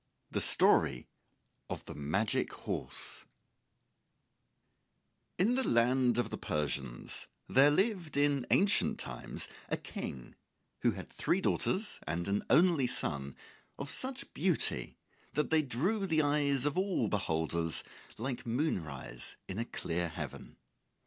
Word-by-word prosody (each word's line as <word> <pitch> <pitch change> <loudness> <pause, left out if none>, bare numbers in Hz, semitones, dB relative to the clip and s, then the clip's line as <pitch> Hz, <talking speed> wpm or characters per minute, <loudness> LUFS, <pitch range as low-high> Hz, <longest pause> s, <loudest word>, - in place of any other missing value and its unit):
THE - - 0
STORY 60 - +4 0.6
OF - - -5
THE - - -6
MAGIC 80 +10 0
HORSE - - -3 2.1
In 210 +7 +3
the 260 +1 +2
land 120 +1 +3
of 120 - 0
the - - -4
Persians 70 -5 -2 0.2
there 135 +2 +6
lived 180 -2 0
in 145 -3 +2
ancient 200 +1 +4
times 65 -1 -3 0.2
a - - 0
King 65 -3 -7 0.5
who - - +3
had - - -8
three 180 - +1
daughters 200 +2 0
and 85 +3 -2
an 100 +1 0
only 155 -3 +5
son 70 - -1 0.4
of 140 +1 -4
such 265 +1 -2
beauty 175 +1 +1 0.4
that 150 - 0
they 160 -1 +5
drew 180 - 0
the 155 -3 +3
eyes 145 -2 +2
of 145 +4 +1
all 190 -1 +1
beholders 80 -4 +1 0.3
like 125 +2 -3
moonrise 85 - -3
in 95 +3 -4
a 115 - -1
clear 85 -5 -2
heaven. 80 - -7
130 Hz, 125 wpm, -33 LUFS, -, 2.1 s, there